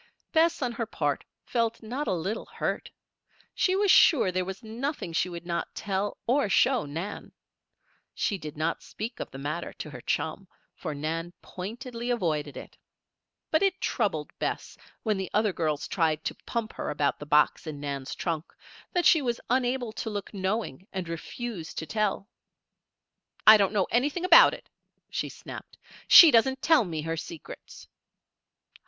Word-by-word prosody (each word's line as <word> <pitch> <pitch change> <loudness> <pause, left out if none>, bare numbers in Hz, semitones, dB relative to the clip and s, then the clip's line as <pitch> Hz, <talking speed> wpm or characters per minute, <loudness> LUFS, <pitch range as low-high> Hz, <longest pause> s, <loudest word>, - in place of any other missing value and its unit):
Bess, 325 -2 +3
on 245 - 0
her 230 -1 -3
part, 145 -9 -1 0.2
felt 230 -1 -1
not 255 +7 -4
a - - +1
little 190 +6 -3
hurt. - - -3 0.6
She 370 - +2
was 400 -1 +4
sure 255 - +6
there 185 0 0
was 190 +5 -7
nothing 230 - -4
she 180 - +1
would 170 -1 -8
not 170 -1 -3
tell 200 0 -2
or 255 -2 +2
show 250 - +3
Nan. 165 +8 -6 0.8
She 200 -3 -1
did 150 -2 -8
not 160 +2 -1
speak 225 +3 -7
of - - -5
the 135 - -10
matter 150 +5 -4
to 150 - -8
her 125 -3 -9
chum, 160 +9 -2 0.3
for 155 -4 -5
Nan 165 +4 -3
pointedly 235 +5 -6
avoided 155 - -1
it. - - -10 0.7
But 315 - +3
it 390 -1 +2
troubled 185 - -1
Bess, - - -3 0.3
when 215 -3 +1
the 190 -1 -3
other 210 -2 +2
girls 155 -4 -1
tried 160 -3 0
to - - -3
pump 230 -2 -2
her - - -4
about 145 -1 0
the 145 - -8
box 150 +2 +3
in 150 -2 -5
Nan's 140 -2 -4
trunk, 165 -2 -3 0.4
that 355 -2 +1
she 320 - +6
was 240 -3 -1
unable 250 -2 +1
to 220 - -4
look 205 -1 -5
knowing 190 - -3
and 185 -2 -4
refuse 170 +2 -6
to 160 - -4
tell. 205 +3 -1 1.2
"I 215 - +11
don't 200 -3 +3
know 200 -3 +2
anything 290 +9 +1
about 340 -2 +8
it," - - -15 0.4
she - - -2
snapped. - - -10 0.3
"She 330 -3 +11
doesn't 265 +3 +3
tell 315 -8 +5
me 160 -4 -4
her 165 +1 -2
secrets." 165 0 -9
200 Hz, 165 wpm, -28 LUFS, 160-240 Hz, 1.2 s, I